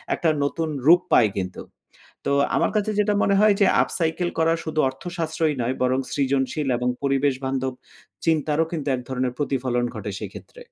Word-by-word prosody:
একটা 165 Hz, -, +1 dB
নতুন 160 Hz, +3 st, -1 dB, 0.2 s
রূপ 175 Hz, +2 st, +7 dB
পায় 110 Hz, -4 st, +6 dB
কিন্তু। 90 Hz, -1 st, -4 dB, 0.7 s
তো -, -, +2 dB, 0.2 s
আমার -, -, +2 dB
কাছে 210 Hz, +1 st, +1 dB
যেটা 210 Hz, 0 st, +2 dB
মনে 200 Hz, -, +3 dB
হয় 210 Hz, -1 st, +5 dB
যে 200 Hz, -, +6 dB, 0.2 s
up -, -, -3 dB
cycle 170 Hz, +2 st, 0 dB
করা 165 Hz, 0 st, +3 dB
শুধু 155 Hz, -1 st, -1 dB
অর্থশাস্ত্রই 160 Hz, +1 st, -2 dB
নয় 125 Hz, +3 st, -1 dB
বরং 130 Hz, +1 st, +2 dB
সৃজনশীল 135 Hz, +1 st, 0 dB
এবং 125 Hz, +1 st, -1 dB
পরিবেশ 140 Hz, 0 st, +2 dB
বান্ধব 130 Hz, 0 st, -1 dB, 0.5 s
চিন্তারও 155 Hz, -1 st, +2 dB
কিন্তু 150 Hz, -4 st, -3 dB
এক -, -, -5 dB
ধরনের 130 Hz, -1 st, -1 dB
প্রতিফলন 130 Hz, -4 st, -1 dB
ঘটে 105 Hz, -1 st, -5 dB
সেক্ষেত্রে। -, -, -10 dB
145 Hz, 170 wpm, -23 LUFS, 130-165 Hz, 0.7 s, রূপ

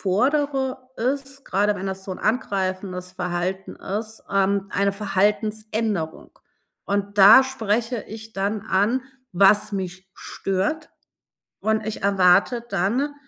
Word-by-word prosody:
fordere, 265 Hz, +6 st, +1 dB, 0.2 s
ist 275 Hz, +2 st, -3 dB
grade 205 Hz, +1 st, +1 dB
wenn 195 Hz, 0 st, -5 dB
das 190 Hz, 0 st, -5 dB
so 195 Hz, -, -7 dB
'n -, -, -7 dB
angreifendes 185 Hz, -4 st, -2 dB
Verhalten 180 Hz, +1 st, -3 dB
ist, 215 Hz, +2 st, -5 dB
ähm, 195 Hz, 0 st, +1 dB
eine 200 Hz, 0 st, +1 dB
Verhaltensänderung, 210 Hz, -2 st, -1 dB, 0.5 s
und 200 Hz, 0 st, -2 dB
da 205 Hz, +6 st, +9 dB
spreche 230 Hz, -2 st, -1 dB
ich 220 Hz, 0 st, -10 dB
dann 200 Hz, +2 st, -1 dB
an, 220 Hz, +5 st, +1 dB, 0.3 s
was 200 Hz, +3 st, +4 dB
mich 190 Hz, -1 st, -5 dB
stört, 195 Hz, +12 st, -3 dB, 0.7 s
und 220 Hz, 0 st, 0 dB
ich 220 Hz, -, -4 dB
erwarte 195 Hz, +4 st, +3 dB
dann, 230 Hz, +10 st, 0 dB
205 Hz, 115 wpm, -23 LUFS, 190-225 Hz, 0.7 s, da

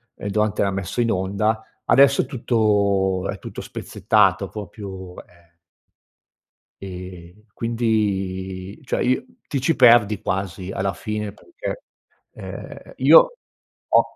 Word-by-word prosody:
ehm, -, -, -7 dB
durante 105 Hz, 0 st, 0 dB
la 100 Hz, -, +1 dB
messa 95 Hz, +3 st, -4 dB
in 115 Hz, -1 st, +2 dB
onda. 105 Hz, +4 st, 0 dB, 0.2 s
Adesso 140 Hz, 0 st, +5 dB
è -, -, -7 dB
tutto 100 Hz, -7 st, +1 dB
è -, -, -4 dB
tutto -, -, -7 dB
spezzettato, 100 Hz, -2 st, +1 dB
proprio 95 Hz, -2 st, -8 dB
eh 85 Hz, -1 st, -25 dB, 1.3 s
ehm, 90 Hz, +1 st, -9 dB
quindi 100 Hz, -5 st, -2 dB
cioè, 130 Hz, -, -2 dB
io 130 Hz, -, +1 dB, 0.2 s
ti 140 Hz, -4 st, -2 dB
ci 160 Hz, +5 st, +2 dB
perdi 115 Hz, -6 st, +6 dB
quasi, 95 Hz, -2 st, -3 dB
alla 95 Hz, 0 st, -1 dB
fine, 105 Hz, +2 st, -4 dB
perché, 350 Hz, -, -7 dB, 0.5 s
ehm, -, -, -9 dB
io -, -, +6 dB, 0.5 s
ho -, -, +6 dB
100 Hz, 120 wpm, -22 LUFS, 95-115 Hz, 1.3 s, perdi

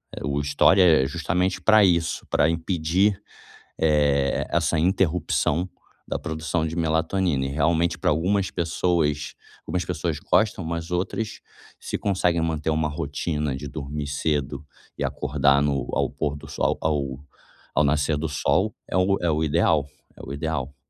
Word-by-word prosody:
eh, -, -, -7 dB
o 70 Hz, 0 st, -1 dB
estore 75 Hz, +7 st, +4 dB
é 80 Hz, -7 st, +5 dB
justamente 90 Hz, +5 st, -1 dB
para 110 Hz, +3 st, +5 dB
isso, 85 Hz, -4 st, +1 dB
para 75 Hz, -, +3 dB
impedir, 85 Hz, +4 st, +1 dB, 0.6 s
eh, 75 Hz, -3 st, +2 dB
essa 85 Hz, 0 st, +1 dB
interrupção 90 Hz, -1 st, +1 dB, 0.4 s
da -, -, -2 dB
produção 80 Hz, +1 st, -2 dB
de 80 Hz, +1 st, -5 dB
melatonina 80 Hz, -2 st, 0 dB
e -, -, -3 dB
realmente 80 Hz, +4 st, +1 dB
para -, -, +1 dB
algumas 95 Hz, +5 st, +1 dB
pessoas 80 Hz, -3 st, 0 dB, 0.3 s
algumas 90 Hz, -2 st, -1 dB
pessoas -, -, -3 dB
gostam, 105 Hz, -4 st, +1 dB
mas 85 Hz, +1 st, -4 dB
outras 95 Hz, +5 st, -2 dB, 0.4 s
se -, -, -4 dB
conseguem 90 Hz, -4 st, +1 dB
manter 80 Hz, -1 st, -1 dB
uma 80 Hz, 0 st, +1 dB
rotina 75 Hz, -1 st, -2 dB
de 65 Hz, -, -7 dB
dormir 75 Hz, +1 st, -5 dB
cedo 75 Hz, 0 st, -2 dB, 0.3 s
e -, -, -4 dB
acordar 70 Hz, 0 st, +2 dB
no 70 Hz, -1 st, 0 dB
ao -, -, +1 dB
pôr 75 Hz, -1 st, -3 dB
do 75 Hz, -, -11 dB
sol, -, -, -1 dB
ao 70 Hz, -4 st, -1 dB, 0.6 s
ao -, -, +4 dB
nascer 75 Hz, +1 st, +1 dB
do 80 Hz, +2 st, -2 dB
sol 75 Hz, -, +1 dB, 0.2 s
é -, -, -2 dB
o 95 Hz, +1 st, +3 dB
é 85 Hz, -, 0 dB
o 80 Hz, 0 st, 0 dB
ideal 75 Hz, -1 st, +2 dB, 0.3 s
é -, -, -17 dB
o 70 Hz, -, -6 dB
ideal. 70 Hz, -2 st, -3 dB
80 Hz, 155 wpm, -24 LUFS, 75-85 Hz, 0.6 s, é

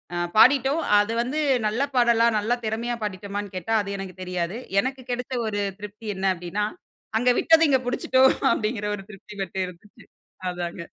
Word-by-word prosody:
ஆ -, -, -2 dB, 0.2 s
பாடிட்டோம். 270 Hz, +6 st, +5 dB, 0.2 s
அது 205 Hz, +2 st, 0 dB
வந்து 260 Hz, +6 st, -2 dB, 0.3 s
நல்ல 220 Hz, +5 st, -1 dB
பாடலா, 235 Hz, -1 st, +4 dB
நல்ல 220 Hz, +4 st, 0 dB
திறமையா 230 Hz, +2 st, -2 dB
பாடிட்டோமான்னு 200 Hz, 0 st, -5 dB
கேட்டா 185 Hz, +5 st, -1 dB
அது 200 Hz, 0 st, -5 dB
எனக்குத் 185 Hz, -1 st, -8 dB
தெரியாது. 180 Hz, +3 st, -3 dB, 0.2 s
எனக்கு 260 Hz, +2 st, -4 dB
கிடைத்த 250 Hz, +1 st, -3 dB
ஒரு 205 Hz, -1 st, -1 dB, 0.2 s
திருப்தி 210 Hz, +2 st, -9 dB
என்ன 190 Hz, +1 st, -3 dB
அப்படின்னா, 180 Hz, +4 st, -2 dB, 0.5 s
அங்க 245 Hz, -, +3 dB
விட்டது 325 Hz, 0 st, +5 dB
இங்க 265 Hz, -, +4 dB
பிடிச்சுட்டோ 260 Hz, +1 st, +2 dB, 0.3 s
அப்படிங்கிற 215 Hz, -1 st, -2 dB
ஒரு 195 Hz, -, -10 dB
திருப்தி 200 Hz, +1 st, -12 dB
மட்டு 190 Hz, 0 st, -6 dB
இருந்துச்சு, 180 Hz, +3 st, -15 dB, 0.5 s
அதாங்க. 175 Hz, -1 st, -5 dB
210 Hz, 160 wpm, -24 LUFS, 195-245 Hz, 0.5 s, பாடிட்டோம்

